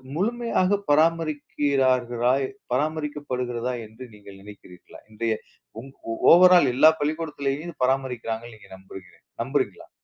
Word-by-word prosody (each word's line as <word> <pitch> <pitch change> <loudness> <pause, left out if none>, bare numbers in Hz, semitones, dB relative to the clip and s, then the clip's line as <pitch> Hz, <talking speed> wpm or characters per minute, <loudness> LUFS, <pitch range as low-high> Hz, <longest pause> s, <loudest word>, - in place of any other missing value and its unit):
முழுமையா 230 +6 -1 0.3
பராமரிக்கிறார்களா 140 -6 +1 0.4
பராமரிக்கப்படுகிறதா? 130 -4 -3
என்று 110 +4 -12
நீங்கள் 100 -1 -14
நினைக்கிறீர்களா? 100 -3 -14
இன்றைய 110 +1 -1 0.5
உங் 135 +2 -13 0.4
ஓவர் 180 +1 +7
ஆல் 140 -7 +3
எல்லா 155 +4 +7
பள்ளிக்கூடத்திலயும் 150 -1 -3
இத - - -10
பராமரிக்கிறாங்கன்னு 120 -3 -3
நீங்கள் 100 -2 -14
நம்புகிறீ 95 -1 -14 0.2
நம்புறீங்களா? - - -3
130 Hz, 100 wpm, -24 LUFS, 115-155 Hz, 0.5 s, ஓவர்